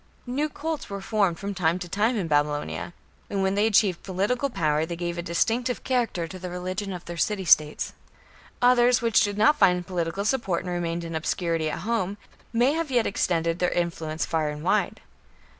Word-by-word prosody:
New 280 Hz, +5 st, -1 dB
cults 315 Hz, +1 st, -4 dB
were 200 Hz, 0 st, -4 dB
formed 195 Hz, -4 st, +1 dB
from 200 Hz, +3 st, -4 dB
time 170 Hz, -2 st, +1 dB
to 180 Hz, -1 st, -6 dB
time 215 Hz, +7 st, +1 dB
in 185 Hz, -5 st, -1 dB
Babylonia, 145 Hz, +2 st, 0 dB, 0.4 s
and 195 Hz, -1 st, -1 dB
when 190 Hz, 0 st, +1 dB
they 205 Hz, +2 st, +3 dB
achieved 205 Hz, -5 st, +3 dB
political 205 Hz, +9 st, -1 dB
power 155 Hz, -, +1 dB
they 170 Hz, +1 st, -4 dB
gave 175 Hz, 0 st, -3 dB
a 175 Hz, -, -3 dB
distinctive 230 Hz, +9 st, 0 dB
character 235 Hz, -10 st, 0 dB
to 185 Hz, +3 st, -9 dB
the 180 Hz, 0 st, -6 dB
religion 185 Hz, +3 st, -4 dB
of 180 Hz, -2 st, -7 dB
their 170 Hz, 0 st, -7 dB
city 195 Hz, +3 st, 0 dB
states. 150 Hz, -2 st, +3 dB, 0.7 s
Others 245 Hz, 0 st, +5 dB
which 230 Hz, -1 st, +4 dB
did 205 Hz, -2 st, 0 dB
not 225 Hz, +8 st, +4 dB
find 180 Hz, -3 st, +4 dB
political 175 Hz, +2 st, -2 dB
support 215 Hz, -8 st, 0 dB
and 180 Hz, -1 st, -4 dB
remained 170 Hz, -1 st, -2 dB
in 165 Hz, 0 st, -6 dB
obscurity 160 Hz, 0 st, -1 dB
at -, -, -4 dB
home, 205 Hz, -2 st, -1 dB, 0.3 s
may 240 Hz, +3 st, +3 dB
have 325 Hz, -1 st, -2 dB
yet 245 Hz, -3 st, +2 dB
extended 170 Hz, -3 st, 0 dB
their 180 Hz, -, +2 dB
influence 165 Hz, -2 st, -2 dB
far 155 Hz, -2 st, 0 dB
and 150 Hz, 0 st, -6 dB
wide. -, -, +1 dB
185 Hz, 190 wpm, -26 LUFS, 170-225 Hz, 0.7 s, Others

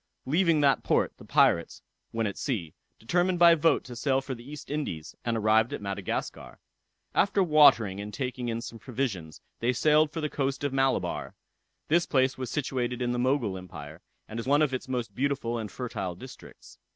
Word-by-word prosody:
Leaving 165 Hz, +2 st, +3 dB
that 140 Hz, -2 st, +3 dB
port, -, -, +1 dB
the -, -, -13 dB
pirates, 85 Hz, -, +2 dB, 0.3 s
when 115 Hz, 0 st, -2 dB
at 100 Hz, -, -2 dB
sea, 95 Hz, -, -3 dB, 0.2 s
determined 175 Hz, +9 st, +1 dB
by 170 Hz, -1 st, +8 dB
vote 165 Hz, 0 st, +2 dB
to 125 Hz, -, -9 dB
sail 135 Hz, +2 st, +1 dB
for 135 Hz, 0 st, -5 dB
the 120 Hz, -1 st, -10 dB
East 150 Hz, -1 st, -9 dB
Indies, 115 Hz, -, -4 dB
and 115 Hz, -1 st, -1 dB
arrived 110 Hz, +1 st, +3 dB
at -, -, -3 dB
Madagascar. 100 Hz, -1 st, -4 dB, 0.6 s
After 200 Hz, 0 st, +3 dB
watering 130 Hz, -, +5 dB
and 105 Hz, +1 st, -6 dB
taking 125 Hz, +1 st, -4 dB
in 115 Hz, 0 st, -2 dB
some 115 Hz, -1 st, -8 dB
provisions 110 Hz, -, -4 dB, 0.2 s
they 120 Hz, +2 st, +1 dB
sailed 150 Hz, +4 st, +4 dB
for 165 Hz, -, -4 dB
the 155 Hz, -, -1 dB
coast 140 Hz, -1 st, -2 dB
of 145 Hz, -2 st, -1 dB
Malabar. 135 Hz, 0 st, 0 dB, 0.5 s
This 170 Hz, +2 st, +2 dB
place 130 Hz, -1 st, +2 dB
is 130 Hz, -2 st, -4 dB
situated 125 Hz, -3 st, -2 dB
in 120 Hz, -1 st, 0 dB
the 120 Hz, -, -1 dB
Mogul 120 Hz, -7 st, 0 dB
Empire, 80 Hz, -3 st, -10 dB, 0.3 s
and 110 Hz, -, -6 dB
is 115 Hz, -, -5 dB
one 145 Hz, +2 st, +4 dB
of 140 Hz, -3 st, 0 dB
its 130 Hz, -, -4 dB
most 125 Hz, -3 st, -3 dB
beautiful 130 Hz, -3 st, -1 dB
and 110 Hz, -2 st, -6 dB
fertile 100 Hz, -8 st, -4 dB
districts. 125 Hz, +8 st, -13 dB
130 Hz, 190 wpm, -28 LUFS, 110-145 Hz, 0.6 s, by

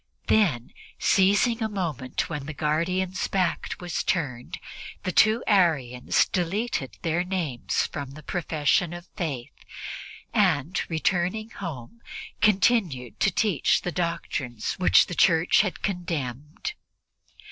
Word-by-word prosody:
Then, 150 Hz, -, +2 dB, 0.2 s
seizing 205 Hz, +5 st, +3 dB
a 220 Hz, -, 0 dB
moment 160 Hz, -, -2 dB
when 150 Hz, -3 st, -5 dB
the 155 Hz, -, -6 dB
guardian's 180 Hz, +5 st, 0 dB
back 185 Hz, -3 st, -1 dB
was 175 Hz, -2 st, -2 dB
turned, 140 Hz, -, -2 dB, 0.5 s
the 185 Hz, -, -1 dB
two 220 Hz, +6 st, +4 dB
Arians 150 Hz, -, +2 dB
deleted 185 Hz, -, -2 dB
their 170 Hz, +1 st, +1 dB
names 175 Hz, -10 st, -1 dB
from 140 Hz, -2 st, -5 dB
the 150 Hz, +3 st, -11 dB
profession 160 Hz, +1 st, 0 dB
of 175 Hz, 0 st, -8 dB
Faith 140 Hz, -8 st, -4 dB, 0.8 s
and, 180 Hz, -4 st, +2 dB
returning 180 Hz, +6 st, 0 dB
home, 170 Hz, -, -7 dB, 0.4 s
continued 190 Hz, -, +2 dB
to -, -, +4 dB
teach 195 Hz, -, +2 dB
the 180 Hz, -, -2 dB
doctrines 165 Hz, -9 st, -2 dB
which 185 Hz, -, +6 dB
the -, -, -6 dB
Church 165 Hz, +1 st, +4 dB
had 200 Hz, -3 st, -3 dB
condemned. 160 Hz, -, -3 dB
175 Hz, 115 wpm, -26 LUFS, 145-190 Hz, 0.8 s, which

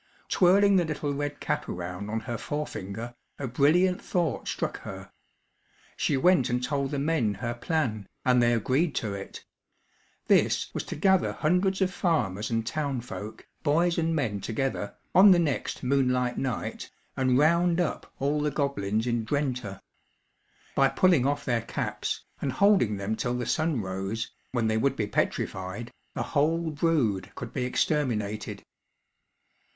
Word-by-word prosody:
Twirling 195 Hz, +2 st, +5 dB
the 180 Hz, -, +4 dB
little 150 Hz, -2 st, -2 dB
red 145 Hz, +1 st, -3 dB
cap -, -, -2 dB
around 90 Hz, +3 st, -5 dB
on 110 Hz, +1 st, -2 dB
her 120 Hz, +1 st, -4 dB
forefinger, 120 Hz, -6 st, -5 dB, 0.2 s
a 140 Hz, -, -3 dB
brilliant 165 Hz, +9 st, +3 dB
thought 170 Hz, -8 st, -1 dB
struck -, -, -2 dB
her. -, -, -9 dB, 0.8 s
She 140 Hz, -, +1 dB
went 160 Hz, -2 st, +4 dB
and 125 Hz, +1 st, 0 dB
told 140 Hz, +1 st, -1 dB
the 145 Hz, -, -2 dB
men 140 Hz, -8 st, +1 dB
her 120 Hz, +3 st, -3 dB
plan, 120 Hz, -, -1 dB, 0.2 s
and 125 Hz, -1 st, +4 dB
they 120 Hz, 0 st, +4 dB
agreed 135 Hz, -, +1 dB
to 105 Hz, -3 st, -2 dB
it. 100 Hz, 0 st, -8 dB, 0.8 s
This -, -, +2 dB
was -, -, -2 dB
to -, -, -5 dB
gather 190 Hz, +4 st, +3 dB
hundreds 185 Hz, +4 st, +1 dB
of 185 Hz, -1 st, +1 dB
farmers 110 Hz, -, 0 dB
and 115 Hz, -1 st, -1 dB
townfolk, 125 Hz, -6 st, -4 dB, 0.2 s
boys 170 Hz, +3 st, +2 dB
and 165 Hz, 0 st, +1 dB
men 110 Hz, -10 st, -1 dB
together, 115 Hz, 0 st, -2 dB, 0.2 s
on 195 Hz, +3 st, +8 dB
the 185 Hz, -, +7 dB
next 155 Hz, -6 st, -1 dB
moonlight 125 Hz, -2 st, +1 dB
night, 130 Hz, -4 st, -3 dB, 0.3 s
and 130 Hz, -1 st, +2 dB
round 170 Hz, +4 st, +3 dB
up 175 Hz, -4 st, -2 dB
all 145 Hz, +2 st, 0 dB
the 150 Hz, -, +1 dB
goblins 115 Hz, -7 st, -1 dB
in 120 Hz, -2 st, 0 dB
Drenthe. 125 Hz, -5 st, -2 dB, 0.9 s
By 135 Hz, -1 st, +4 dB
pulling 170 Hz, -8 st, +3 dB
off 145 Hz, 0 st, -1 dB
their 120 Hz, -3 st, +1 dB
caps, 115 Hz, -, -3 dB, 0.2 s
and 135 Hz, -, 0 dB
holding 185 Hz, -, +4 dB
them 100 Hz, +3 st, -2 dB
till 120 Hz, +2 st, -1 dB
the 120 Hz, -, -2 dB
sun 155 Hz, -2 st, 0 dB
rose, 95 Hz, +4 st, -3 dB, 0.2 s
when 120 Hz, -3 st, 0 dB
they 110 Hz, 0 st, +1 dB
would 135 Hz, +4 st, +1 dB
be 105 Hz, -, -1 dB
petrified, 100 Hz, +2 st, -2 dB, 0.2 s
the -, -, -1 dB
whole 160 Hz, +2 st, +1 dB
brood 145 Hz, -, +1 dB
could -, -, -7 dB
be 125 Hz, -, -1 dB
exterminated. 115 Hz, -7 st, -1 dB
135 Hz, 155 wpm, -27 LUFS, 115-160 Hz, 0.9 s, on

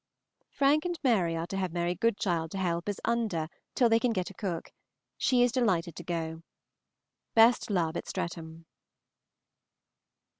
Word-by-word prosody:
Frank 285 Hz, +2 st, +3 dB
and 350 Hz, -2 st, -3 dB
Mary 190 Hz, -10 st, +2 dB
are 165 Hz, -, -2 dB
to 195 Hz, -, -5 dB
have 185 Hz, -3 st, -1 dB
Mary 175 Hz, +1 st, 0 dB
Goodchild 180 Hz, -5 st, 0 dB
to 195 Hz, -, -6 dB
help 170 Hz, 0 st, -1 dB
as 205 Hz, -, -3 dB
Under 220 Hz, -9 st, 0 dB, 0.3 s
till 245 Hz, -, +4 dB
they 225 Hz, 0 st, +4 dB
can 240 Hz, -1 st, +1 dB
get 185 Hz, -2 st, -2 dB
a -, -, -13 dB
cook. 180 Hz, -4 st, -4 dB, 0.4 s
She 250 Hz, -2 st, +3 dB
is 245 Hz, -, +3 dB
delighted 185 Hz, -, +1 dB
to 175 Hz, -, -7 dB
go. 165 Hz, -2 st, -3 dB, 0.9 s
Best 230 Hz, +1 st, +5 dB
love 170 Hz, -5 st, 0 dB
at -, -, -4 dB
Streatham. 165 Hz, -1 st, -5 dB
185 Hz, 155 wpm, -29 LUFS, 170-230 Hz, 0.9 s, Best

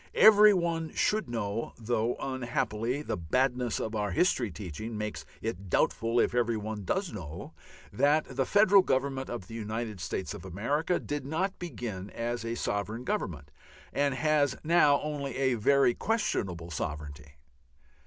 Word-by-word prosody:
Every 210 Hz, -1 st, +8 dB
one 170 Hz, -4 st, 0 dB
should 215 Hz, -, +1 dB
know, 115 Hz, -1 st, -3 dB
though 115 Hz, +1 st, 0 dB
unhappily 125 Hz, 0 st, -2 dB
the -, -, -2 dB
badness 125 Hz, +6 st, 0 dB
of 110 Hz, 0 st, -3 dB
our 105 Hz, -1 st, 0 dB
history 120 Hz, -, +2 dB
teaching 105 Hz, +4 st, -6 dB
makes 105 Hz, 0 st, -4 dB, 0.2 s
it 100 Hz, -4 st, -4 dB
doubtful 115 Hz, +7 st, +2 dB
if -, -, +2 dB
every 120 Hz, -2 st, +1 dB
one 105 Hz, -1 st, -5 dB
does 190 Hz, -, -1 dB
know, 85 Hz, -5 st, -7 dB, 0.4 s
that 150 Hz, +2 st, +3 dB
the 135 Hz, 0 st, 0 dB
Federal 205 Hz, -1 st, +6 dB
Government 135 Hz, -3 st, -1 dB
of 120 Hz, -6 st, -5 dB
the 115 Hz, -, -11 dB
United 110 Hz, -1 st, -4 dB
States 95 Hz, -, -3 dB
of -, -, -9 dB
America 130 Hz, -, -1 dB
did 145 Hz, -2 st, -4 dB
not 165 Hz, +8 st, -2 dB
begin 110 Hz, -, -5 dB
as 120 Hz, +1 st, -3 dB
a 115 Hz, 0 st, -3 dB
sovereign 105 Hz, +2 st, -2 dB
Government, 85 Hz, -, -3 dB, 0.4 s
and 140 Hz, -1 st, +1 dB
has 145 Hz, -2 st, +2 dB
now 150 Hz, -3 st, +5 dB
only 140 Hz, -4 st, -3 dB
a 130 Hz, -1 st, +2 dB
very 125 Hz, +3 st, +4 dB
questionable 95 Hz, -, -1 dB
sovereignty. 75 Hz, -1 st, -5 dB
120 Hz, 150 wpm, -29 LUFS, 105-145 Hz, 0.4 s, Every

